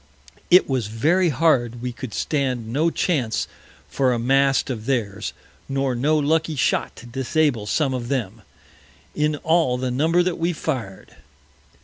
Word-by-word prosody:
It 180 +1 +6
was 130 -6 -1
very 160 - +2
hard 130 -6 +2
we 125 +1 -4
could 125 -1 -7
stand 125 -6 -1
no 155 +5 +2
Chance 140 -10 -1 0.4
for 130 -2 +1
a - - 0
Mast 135 +3 +2
of 115 -2 -6
theirs, 105 -6 -1 0.4
nor 135 -1 0
no 145 +6 +1
lucky 160 +2 +1
Shot 130 - 0
to 120 - -12
disable 130 -2 0
some 140 +3 +1
of 120 -2 -4
them, 125 -8 -3 0.7
in 150 0 0
all 160 -6 +2
the 130 0 -2
Number 160 +7 +2
that 180 -2 -2
we 170 +2 0
fir'd. 125 - -5
135 Hz, 150 wpm, -22 LUFS, 120-155 Hz, 0.7 s, It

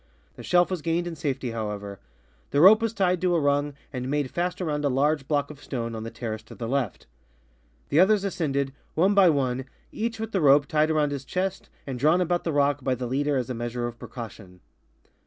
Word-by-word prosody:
The - - -10
shelf 180 +1 +3
was 180 -4 -2
gained 165 +3 0
in 170 -1 -5
safety, 135 -5 -3
how 110 -2 -3
ever; 100 -1 -6 0.5
the 140 - +1
rope 205 +7 +8
was 230 -1 0
tied 185 -4 +1
to 180 -1 +2
a - - +3
rung 145 0 +1 0.2
and 125 0 -4
made 145 -2 -1
fttst 175 +1 -1
around 150 -5 -2
a 145 - +2
large 140 +1 +1
block 145 -1 0
of 145 -1 -13
stone 115 -3 -4
on 110 - -5
the 115 - -5
terrace 110 -2 -5
to - - -12
the 115 - -5
left. 130 -5 -2 0.8
The 145 - +3
others 200 +2 +5
ascended, 140 -8 -1 0.2
one 190 +5 +3
by 195 -3 +6
one, 130 -4 0 0.3
each 225 +1 -3
witli 220 0 -5
the 190 - 0
rope 145 0 +6
tied 155 +2 +2
around 150 -2 +1
liis 140 -1 -4
chest 185 +6 -3 0.2
and 130 -3 -5
drawn 155 +7 +4
about 175 -1 0
the 165 - 0
rock 145 -1 +1
by 130 -1 +1
the 125 0 -4
leader 140 +3 0
as 130 0 -2
a - - -1
measure 120 +1 -3
of 120 0 -6
precaution. 105 -7 -9
145 Hz, 225 wpm, -26 LUFS, 125-175 Hz, 0.8 s, rope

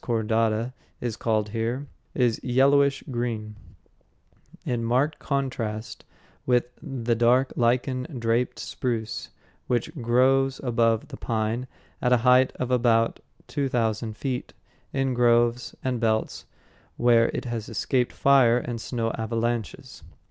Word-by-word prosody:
contorta_ 115 +1 0 0.3
is 120 -3 -3
called 110 -2 0
here, 115 +5 -2 0.3
is 120 -3 +1
yellowish 140 +2 +3
green, 115 -3 -3 1.1
in 120 -2 -1
marked 130 +6 +1
contrast 120 -6 -3 0.4
with 125 -1 +2 0.2
the 120 -3 -2
dark 120 +3 +3
lichen 125 +2 +1
draped 115 +1 0
spruce 115 -3 -3 0.4
which 120 -2 -1
grows 130 +3 +3
above 115 -3 +1
the - - -8
pine 115 +2 -2 0.3
at 125 - +1
a 125 - +6
height 125 +1 +5
of 125 0 -3
about 115 -2 +2 0.3
two 140 -2 -2
thousand 110 -2 -1
feet, 130 -3 -4 0.4
in 135 -1 0
groves 120 0 +2
and 130 -2 -1
belts 110 -1 -1 0.5
where 120 -1 +4
it - - -4
has 115 -2 -4
escaped 125 +2 0
fire 130 -4 +4
and 120 -2 -4
snow 115 -2 -2
avalanches. 115 -1 -3
120 Hz, 120 wpm, -25 LUFS, 115-125 Hz, 1.1 s, a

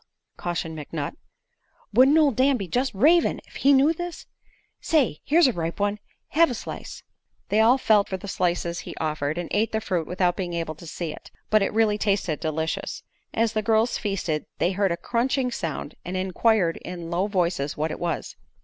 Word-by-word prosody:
cautioned 170 -2 -3
McNutt. 150 -1 -4 0.8
"Wouldn't 265 +7 +6
ol' 300 -3 +5
Dan 265 +2 +3
be 195 -4 -5
jest 250 +8 0
ravin' 320 - +4
ef - - -11
he 280 - +4
knew 280 +4 +5
this? 350 +1 -6 0.5
Say 265 - +1
here's 330 +4 +4
a 255 - +3
ripe 170 +1 -3
one. 205 +1 0 0.3
Hev 330 +1 +4
a - - -2
slice." - - -7 0.5
They 210 - +2
all 230 +4 +6
felt 215 -5 +3
for 190 - -2
the 195 - -9
slices 175 -2 -1
he - - -8
offered 155 -1 -2
and 175 -1 -3
ate 215 +1 +1
the 220 - +1
fruit 180 -6 -2
without 180 0 +1
being 180 -2 -4
able 165 -2 -2
to 165 +2 -13
see 160 +1 -4
it. - - -11 0.2
But 215 0 +5
it 195 - +1
really 215 -1 +2
tasted 195 -7 0
delicious. 160 0 -3 0.3
As 225 0 +1
the 215 - +1
girls 220 +2 +2
feasted 185 -7 -2
they 180 - +1
heard 195 0 +1
a 170 - -1
crunching 250 +4 0
sound 155 -7 -4
and 185 +1 -4
inquired 185 -1 +2
in 175 -2 -7
low 180 +4 +1
voices 175 -7 -1
what 155 +1 -1
it - - -5
was. 170 -1 -3
195 Hz, 195 wpm, -25 LUFS, 170-230 Hz, 0.8 s, Wouldn't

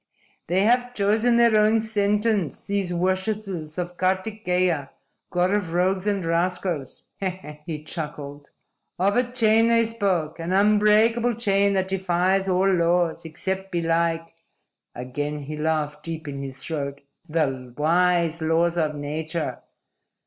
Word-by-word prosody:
"They 180 +3 +2
have 245 +2 +2
chosen 215 +4 +2
their 235 -2 +5
own 215 +1 +4
sentence, 210 -4 0
these 200 -3 -1
worshipers 185 -2 -2
of 180 0 -4
Kartikeya, 185 -5 0 0.4
God 180 +1 +1
of 190 -5 -1
Rogues 185 +2 +1
and 200 -4 0
Rascals," 170 -3 -1 0.2
he 160 -5 -6
chuckled. 145 -3 -7 0.5
"Of 195 +3 +2
a 245 0 +1
chain 225 -2 +4
they 230 0 +4
spoke. 185 -8 -1
An 165 +2 -2
unbreakable 215 +4 +4
chain 200 -3 +2
that 190 -1 0
defies 190 +1 +1
all 185 +1 +2
laws, 170 -1 +1
except 190 +4 -4
belike" 165 -1 0 0.6
again 145 +4 -4
he 150 +2 -6
laughed 150 -1 -1
deep 165 -1 -6
in 140 -1 -5
his 135 -1 -6
throat 140 -3 -4 0.3
"the 135 -6 -1
wise 170 +1 +2
laws 165 +2 +1
of 155 -2 0
nature. 155 +3 -4
180 Hz, 125 wpm, -24 LUFS, 160-200 Hz, 0.6 s, their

